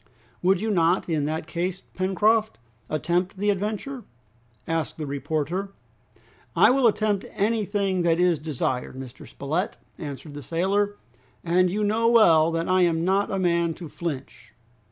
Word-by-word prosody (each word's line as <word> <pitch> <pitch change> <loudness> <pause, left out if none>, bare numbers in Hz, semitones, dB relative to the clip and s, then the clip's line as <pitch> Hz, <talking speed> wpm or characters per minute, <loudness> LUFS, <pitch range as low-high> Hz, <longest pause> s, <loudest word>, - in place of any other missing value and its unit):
"Would 185 0 +3
you 220 0 0
not, 175 -1 +2
in 155 -4 0
that 155 +1 -2
case, 175 +3 -3
Pencroft, 215 +4 +1 0.3
attempt 175 +5 -1
the 205 +2 +2
adventure?" 215 +6 -3 0.6
asked 165 -2 -2
the 155 - -4
reporter. 155 +7 -3 0.8
"I - - +6
will 260 -2 +4
attempt 210 -2 +1
anything 200 -3 0
that 170 -1 +2
is 180 -3 +3
desired, 130 -5 -2
Mr. 130 -1 -9
Spilett," 160 +8 -3 0.2
answered 145 -1 -7
the 145 - -7
sailor, 195 - 0 0.5
"and 180 +2 +3
you 210 +4 -1
know 220 +3 +2
well 170 -9 +6
that 165 0 -1
I 185 0 +3
am 165 -1 +2
not 195 +2 +2
a 195 - -1
man 170 -3 +1
to 175 - -8
flinch!" 135 -7 -6
180 Hz, 150 wpm, -25 LUFS, 160-205 Hz, 0.8 s, I